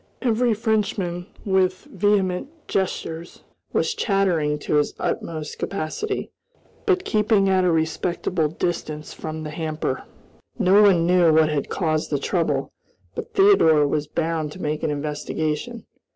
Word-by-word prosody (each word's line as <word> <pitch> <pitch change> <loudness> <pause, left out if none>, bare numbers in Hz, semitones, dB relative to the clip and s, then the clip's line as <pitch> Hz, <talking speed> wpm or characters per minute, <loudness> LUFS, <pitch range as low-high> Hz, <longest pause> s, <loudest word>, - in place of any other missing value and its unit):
Every 240 -1 +2
Frenchman, 200 -5 -1 0.2
with 185 -2 +1
vehement 195 +1 0 0.2
gestures, 170 -3 -3 0.3
was - - +1
chattering 180 -8 +1
to 150 - +1
his 150 - +1
utmost 155 -2 -3
capacity, 200 - -3 0.6
but 380 -2 +2
keeping 210 -2 +2
at 190 -1 +3
a 180 - +3
respectful 160 0 0
distance 155 -1 -3
from 155 0 -6
the 150 - -5
hamper. 155 -4 -3 0.6
No 195 +3 +5
one 185 -5 +5
knew 175 -2 +5
what 155 0 +4
had 145 -2 -2
caused 155 -4 -1
the 145 - +1
trouble; 165 +4 -1 0.4
but - - -7
Theodore 165 - +5
was 150 +1 -1
bound 160 -1 -2
to - - -11
make 150 0 -2
an - - 0
investigation. 150 +8 -3
170 Hz, 135 wpm, -23 LUFS, 155-195 Hz, 0.6 s, No